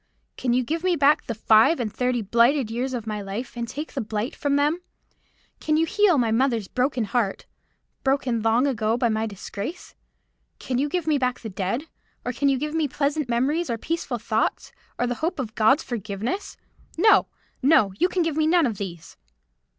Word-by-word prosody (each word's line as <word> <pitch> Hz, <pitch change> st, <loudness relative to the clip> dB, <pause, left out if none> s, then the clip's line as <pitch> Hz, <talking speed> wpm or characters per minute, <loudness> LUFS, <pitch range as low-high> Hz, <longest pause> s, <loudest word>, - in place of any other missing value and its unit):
Can 250 Hz, -, -1 dB
you 255 Hz, +1 st, +2 dB
give 325 Hz, +7 st, -3 dB
me 365 Hz, -1 st, +2 dB
back 295 Hz, 0 st, +3 dB
the 230 Hz, -, -3 dB
five 220 Hz, +7 st, +4 dB
and 220 Hz, -4 st, -3 dB
thirty 250 Hz, -2 st, 0 dB
blighted 235 Hz, +4 st, +3 dB
years 255 Hz, +3 st, -2 dB
of 230 Hz, -3 st, -5 dB
my 210 Hz, -1 st, -3 dB
life, 205 Hz, +6 st, -6 dB
and 235 Hz, -1 st, -3 dB
take 295 Hz, +6 st, -6 dB
the 270 Hz, -, -2 dB
blight 220 Hz, +2 st, -3 dB
from 285 Hz, -1 st, 0 dB
them? 295 Hz, +5 st, +1 dB, 0.8 s
Can 310 Hz, 0 st, +1 dB
you 325 Hz, -, +3 dB
heal 385 Hz, -1 st, +3 dB
my 235 Hz, -3 st, +2 dB
mother's 230 Hz, -3 st, +1 dB
broken 255 Hz, -1 st, 0 dB
heart,—broken, 245 Hz, +3 st, -3 dB
long 225 Hz, +4 st, +3 dB
ago 230 Hz, -4 st, 0 dB
by 240 Hz, -1 st, +1 dB
my 220 Hz, 0 st, 0 dB
disgrace? 205 Hz, -, -7 dB, 0.6 s
Can 255 Hz, -1 st, -2 dB
you 290 Hz, +2 st, 0 dB
give 355 Hz, +1 st, -2 dB
me 305 Hz, -3 st, +2 dB
back 255 Hz, -1 st, -1 dB
the 225 Hz, -, -6 dB
dead? 195 Hz, +8 st, -2 dB, 0.4 s
Or 250 Hz, -, -2 dB
can 280 Hz, +4 st, +1 dB
you 270 Hz, -, +2 dB
give 300 Hz, +3 st, -3 dB
me 320 Hz, -2 st, +1 dB
pleasant 285 Hz, 0 st, -1 dB
memories, 285 Hz, +9 st, 0 dB
or 230 Hz, -, -1 dB
peaceful 315 Hz, -2 st, -3 dB
thoughts, 220 Hz, 0 st, -1 dB, 0.3 s
or 245 Hz, -, +1 dB
the 245 Hz, -, -1 dB
hope 335 Hz, +3 st, -1 dB
of 240 Hz, -6 st, -4 dB
God's 235 Hz, +7 st, +3 dB
forgiveness? 230 Hz, -, -4 dB, 0.4 s
No, 425 Hz, +5 st, +5 dB, 0.3 s
no; 255 Hz, -9 st, +4 dB
you 360 Hz, -, +3 dB
can 365 Hz, -2 st, +1 dB
give 325 Hz, -2 st, -1 dB
me 310 Hz, 0 st, +2 dB
none 340 Hz, -1 st, +4 dB
of 225 Hz, -6 st, -2 dB
these." 170 Hz, -4 st, -7 dB
250 Hz, 195 wpm, -24 LUFS, 225-300 Hz, 0.8 s, No